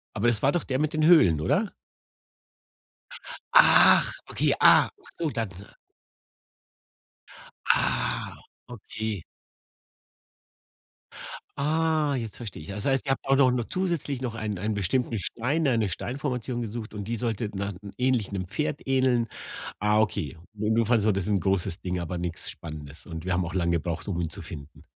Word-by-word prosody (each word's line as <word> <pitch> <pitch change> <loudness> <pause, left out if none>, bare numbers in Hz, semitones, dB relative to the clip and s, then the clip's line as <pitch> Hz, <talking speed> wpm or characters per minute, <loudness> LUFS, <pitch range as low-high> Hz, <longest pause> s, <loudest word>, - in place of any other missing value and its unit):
Aber 110 +3 +1
es 115 -3 +1
war 140 - +4
doch 175 - -1
der 130 -1 -1
mit 155 +2 0
den 155 0 +2
Höhlen, 155 - +6
oder? 200 - +1 1.8
Ach, - - +7 0.2
okay, - - +1
ah, - - +7
ach 405 - -17
so, 165 -2 -1
dann. 115 -5 -2 2.2
Ah, - - +1 0.3
okay. 110 -4 -5 2.4
Ah, 155 0 +1
jetzt 115 -5 -5
verstehe 105 -9 -8
ich. - - -12
Das 100 +1 -5
heißt, 135 0 +1
ihr 135 - +2
habt - - -4
auch 135 - +5
noch 130 -2 +5
noch 120 -2 -1
zusätzlich 170 -8 -2
noch 125 -3 -3
einen 110 -3 -3
einen 105 +4 -1
bestimmten 110 +4 0
Stein 140 - -1
eine 115 -5 +2
Steinformation 125 - -3
gesucht, 110 -1 -6
und 100 -1 -5
die 115 - -2
sollte 115 -2 -2
na 100 +1 -3 0.2
ähnlich 125 -5 +1
'nem 95 -2 -3
Pferd 150 +6 -1
ähneln. 130 -3 +2 0.5
Ah, 105 +1 +3
okay, 85 -8 -1 0.2
jedenfalls 110 +1 +2
war 110 - +4
das 100 -1 -2
'n 100 -2 +2
großes 95 -1 -1
Ding, 90 -1 -2
aber 85 +1 -4
nix 85 -1 -3
Spannendes, 75 -2 -9
und 80 0 -7
wir 95 - 0
haben 90 0 +1
auch 85 +2 -6
lange 85 -2 +1
gebraucht, 85 +3 -4
um 90 -4 -1
ihn 80 - -2
zu - - -7
finden. 70 0 -10
110 Hz, 160 wpm, -26 LUFS, 95-130 Hz, 2.4 s, Ach